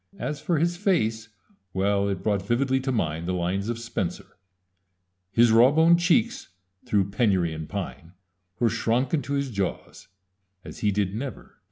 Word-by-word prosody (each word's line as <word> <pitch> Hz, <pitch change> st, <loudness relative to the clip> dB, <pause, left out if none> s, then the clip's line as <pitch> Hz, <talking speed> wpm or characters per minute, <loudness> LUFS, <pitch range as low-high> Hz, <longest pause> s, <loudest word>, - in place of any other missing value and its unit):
As 150 Hz, 0 st, -4 dB
for 170 Hz, -, 0 dB
his 170 Hz, +3 st, 0 dB
face 115 Hz, -, 0 dB, 0.5 s
well, 100 Hz, +1 st, +1 dB
it 95 Hz, -2 st, -3 dB
brought 100 Hz, -3 st, +1 dB
vividly 130 Hz, +6 st, +1 dB
to 130 Hz, 0 st, -2 dB
mind 85 Hz, -7 st, -2 dB
the 90 Hz, -, -1 dB
lines 95 Hz, +4 st, -1 dB
of 120 Hz, -, -2 dB
Spenser 115 Hz, -6 st, -5 dB, 1.0 s
His 115 Hz, +1 st, +4 dB
rawbone 150 Hz, +9 st, +6 dB
cheekes, 220 Hz, +7 st, +1 dB, 0.4 s
through 100 Hz, -2 st, +1 dB
penurie 95 Hz, -7 st, +1 dB
and 80 Hz, -1 st, -7 dB
pine, 95 Hz, -3 st, -6 dB, 0.5 s
Were 120 Hz, -, +3 dB
shronke 115 Hz, +4 st, 0 dB
into 140 Hz, -2 st, -1 dB
his 140 Hz, -2 st, -1 dB
jawes, 100 Hz, -4 st, -4 dB, 0.6 s
as -, -, -9 dB
he 105 Hz, -, +1 dB
did 100 Hz, -1 st, -1 dB
never 125 Hz, +1 st, -5 dB
dyne. -, -, -33 dB
115 Hz, 160 wpm, -25 LUFS, 100-135 Hz, 1.0 s, rawbone